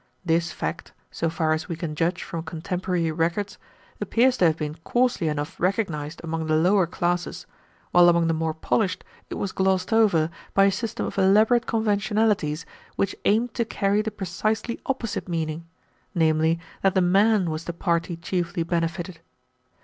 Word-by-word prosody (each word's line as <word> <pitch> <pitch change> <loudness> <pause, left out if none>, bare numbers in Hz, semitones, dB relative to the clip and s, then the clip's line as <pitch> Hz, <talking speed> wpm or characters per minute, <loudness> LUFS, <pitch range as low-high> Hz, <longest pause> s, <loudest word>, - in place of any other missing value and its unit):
This 170 0 +1
fact, - - -5 0.2
so 165 - -1
far 160 -1 +1
as 155 +1 -3
we 170 - -2
can 160 -1 -4
judge 170 +4 -1
from 165 - -5
contemporary 170 +1 -2
records, 170 +5 -1 0.4
appears 250 +2 +3
to 180 - +4
have 160 -1 +3
been 150 -1 -3
coarsely 245 -7 +1
enough 150 -1 -3
recognized 170 -5 -1
among 165 -1 -3
the 155 - +2
lower 180 +3 +3
classes, 175 +1 -2 0.5
while 175 0 +7
among 170 -1 +3
the 165 - +2
more 160 0 -1
polished 185 +4 0 0.3
it - - -5
was 200 - -3
glossed 190 +1 +1
over 175 -8 +3 0.2
by 195 - +6
a 200 - +4
system 225 +2 -3
of - - -3
elaborate 215 +5 +4
conventionalities 210 -7 +1 0.3
which 195 - 0
aimed 225 +3 +2
to 235 - 0
carry 205 -2 +1
the 220 - -2
precisely 210 +3 -2
opposite 240 -8 -3
meaning, 165 -1 -3 0.5
namely, 160 0 +2 0.2
that 195 -1 +2
the 190 - +4
man 195 0 +3
was 155 +1 -4
the - - -3
party 170 0 -1
chiefly 170 0 -2
benefited. 170 +1 -2
175 Hz, 165 wpm, -25 LUFS, 165-200 Hz, 0.5 s, while